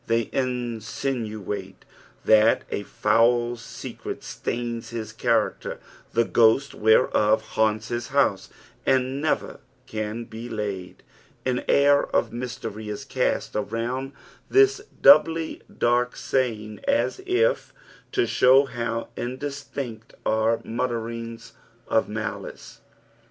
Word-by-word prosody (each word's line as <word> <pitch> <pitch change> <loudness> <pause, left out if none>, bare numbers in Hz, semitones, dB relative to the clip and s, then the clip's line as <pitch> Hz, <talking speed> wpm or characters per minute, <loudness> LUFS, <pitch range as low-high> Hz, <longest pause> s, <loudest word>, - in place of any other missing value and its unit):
They 115 -1 +1
insinuate 115 -5 -3 0.4
that 110 +1 +5
a - - -1
foul 120 +4 +2
secret 115 - -8
stains 115 -1 -4
his 115 -2 -5
character, - - 0 0.3
the 115 0 +3
gliost 120 +6 +3
whereof 110 0 +3
liannts 110 0 +1
his 120 -1 -3
house, - - +1 0.3
and 130 +1 +1
never 155 - -1 0.3
can 110 +1 -4
be 115 +1 -8
laid. 100 -5 -5 0.4
An 125 -1 0
air 140 0 +5
of - - 0
mystery 120 -3 -5
ia 105 -1 -3
cast - - -1
around 115 +6 -2 0.4
this 405 0 +5 0.2
doubly 165 - +6
daik 120 +1 +1
saying, 110 -5 -1
as 285 +7 +1
if 450 +7 +2 0.4
to 385 -2 +2
show 130 +2 +5
how 115 -3 -3
indistinct 130 -3 -5
are 110 +1 +2
the - - -18
muttRrings 115 -1 -4 0.4
of - - +1
malice. - - -6
115 Hz, 110 wpm, -25 LUFS, 110-130 Hz, 0.4 s, doubly